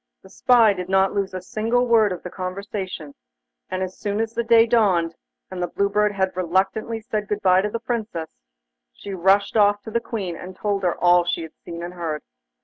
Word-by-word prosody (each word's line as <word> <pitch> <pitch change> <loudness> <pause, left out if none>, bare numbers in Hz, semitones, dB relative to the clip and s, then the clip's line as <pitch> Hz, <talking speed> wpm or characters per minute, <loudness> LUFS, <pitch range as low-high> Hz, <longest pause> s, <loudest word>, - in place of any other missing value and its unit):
The 190 - -16
spy 230 -4 +4
did 180 -1 -6
not 190 0 +3
lose 195 -2 -2
a 185 - -5
single 230 +5 0
word 225 -4 +4
of 180 - -5
the 180 - -7
conversation, 185 -4 -5 0.6
and 185 0 -2
as 185 0 -7
soon 205 0 -2
as 225 0 -2
the 235 - 0
day 230 -1 +6
dawned, 195 -8 +2 0.4
and 185 -1 -5
the 175 - 0
Blue 200 +2 0
Bird 210 0 +2
had 190 -2 -1
reluctantly 190 +5 0
said 215 -2 -3
good 210 0 -3
bye 185 0 +5
to 210 - -1
the 230 - -3
Princess, 220 -9 -4 0.6
she 200 - -9
rushed 195 +3 +2
off 205 -1 +3
to 220 - -8
the 235 - +1
Queen, 200 -8 -4
and 185 +2 -9
told 205 -2 -1
her 180 -2 0
all 175 0 +5
she 175 -1 -2
had 160 - -10
seen 170 0 -7
and 175 +1 -6
heard. 165 -4 -4
195 Hz, 215 wpm, -23 LUFS, 180-215 Hz, 0.6 s, day